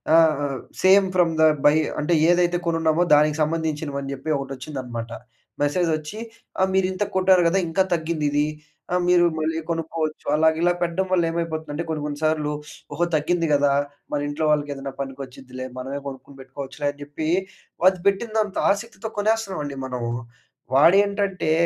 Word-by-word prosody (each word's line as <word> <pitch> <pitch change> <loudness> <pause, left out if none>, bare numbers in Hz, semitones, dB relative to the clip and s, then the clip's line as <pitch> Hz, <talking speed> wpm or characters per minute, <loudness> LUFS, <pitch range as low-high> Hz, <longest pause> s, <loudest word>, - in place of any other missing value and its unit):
ఆహ్, 145 -4 +3 0.3
same 190 +1 +6
from 175 -2 +3
the - - +6 0.2
by 145 +1 +7 0.3
అంటే 150 +4 +1 0.2
ఏదైతే 175 0 +2
కొనున్నామో, 165 0 +2
దానికి 150 +1 +3
సంబంధించినవని 150 -3 -2
జెప్పి 150 +3 -2
ఒకటొచ్చిందన్నమాట. 130 -4 -6 0.5
మెసేజొచ్చి 155 +4 -1 0.4
ఆహ్, 190 - +3
మీరింత 190 +1 +1
కొట్టారు 185 -1 +5
గదా! 195 - +2
ఇంకా 190 +4 +2
తగ్గింది 160 -2 -2
ఇది 145 +1 +2 0.5
ఆహ్, 180 - +2
మీరు 175 -1 +5
మళ్ళీ 160 +1 -1
కొనుక్కోవచ్చు. 160 -1 -3
అలాగా 160 0 +3
ఇలా 175 0 +3
పెట్టడం 175 +2 0
వల్ల 175 -2 +3
ఏమైపోతుందంటే 160 -2 -3
కొన్ని, 155 -2 -2
కొన్ని 145 -1 -4
సార్లు, 155 -1 +1 0.4
ఓహో! 170 +4 +1
తగ్గింది 165 +2 +1
గదా! 140 -1 +3 0.4
మన 145 - 0
ఇంట్లో 150 +2 -2
వాళ్ళకేదైనా 140 -2 -2
పనికొచ్చుద్దిలే, 130 -1 -7
మనమే 135 +2 -4
కొనుక్కొని 135 0 -9
పెట్టుకోవచ్చులే 135 +2 -6
అని 145 - -22
జెప్పి 145 +2 -5 0.6
అది 190 -1 -6
పెట్టినంత 215 0 0
ఆసక్తితో 220 +1 -4
కొనేస్తున్నామండి 200 -10 -1
మనము. 120 -2 -3 0.6
వాడేంటంటే 195 +3 +3
155 Hz, 140 wpm, -23 LUFS, 145-175 Hz, 0.6 s, by